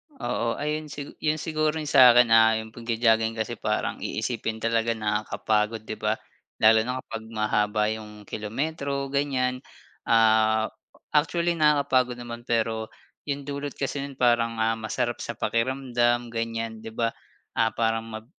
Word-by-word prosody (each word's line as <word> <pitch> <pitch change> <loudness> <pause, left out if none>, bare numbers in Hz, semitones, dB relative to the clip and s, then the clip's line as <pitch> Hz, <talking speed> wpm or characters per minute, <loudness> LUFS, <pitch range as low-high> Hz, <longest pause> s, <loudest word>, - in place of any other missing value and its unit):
Oo. 120 - -2
Ayun 150 +1 -2
sigu 145 -1 -7
'yon 155 0 +1
siguro 155 -1 0
yung 150 - -4
sa'kin 125 -3 +7
ah, 110 0 +6
yung 110 - -10
pagjo-jogging 115 -1 +1
kasi 110 -2 -3
parang - - -1
iisipin 110 0 -3
talaga 115 0 +1
nakakapagod 105 0 -1
'di 110 - -6
ba? 105 0 +1 0.5
Lalo 110 0 +7
na 125 +1 -3
kapag 115 -1 -7
mahaba 105 -1 0
yung 105 -1 -8
kilometro 140 +6 -3
ganyan. 130 -3 0 0.5
Ah, 110 -1 +4 0.4
actually 170 +3 +1
nakakapagod 140 -5 +3
naman 120 0 -8
pero 110 -1 0 0.4
yung 140 0 -2
dulot 140 0 -5
kasi 140 +1 -3
no'n 140 0 -6
parang 120 -2 +2
ah, 115 0 +1
masarap 115 +2 -2
sa 120 - -4
pakiramdam, 120 +1 0
ganyan, 115 -1 -3
'di 110 0 -9
ba? 115 -1 +1 0.5
Ah 115 -1 +2
parang 115 0 0
mag 110 0 -8
115 Hz, 145 wpm, -26 LUFS, 110-135 Hz, 0.5 s, sa'kin